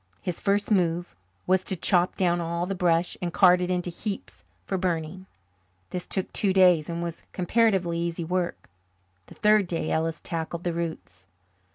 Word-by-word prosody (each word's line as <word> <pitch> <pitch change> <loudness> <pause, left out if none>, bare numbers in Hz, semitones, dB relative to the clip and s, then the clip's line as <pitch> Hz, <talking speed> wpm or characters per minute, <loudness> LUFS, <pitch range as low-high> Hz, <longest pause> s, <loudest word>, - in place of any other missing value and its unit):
His 180 -2 -3
first 200 +1 0
move 175 -3 +1 0.3
was 185 0 +2
to 190 - 0
chop 180 +1 +2
down 175 -2 +2
all 170 +1 -2
the 195 - -3
brush 175 -2 +1
and 175 -1 -2
cart 180 0 +5
it 180 - -1
into 180 -1 -1
heaps 195 - -6 0.2
for - - -2
burning. 180 0 -2 0.6
This 180 -1 -5
took 190 - -3
two 195 -2 +1
days 180 -5 +5
and 170 0 -3
was 170 -1 -5
comparatively 185 -3 +1
easy 170 0 -2
work. 180 +1 -2 0.6
The - - -14
third 210 -2 +4
day 165 -2 -2
Ellis 160 0 -1
tackled 165 +1 -4
the 175 - -1
roots. 160 - -6
175 Hz, 170 wpm, -26 LUFS, 170-185 Hz, 0.6 s, cart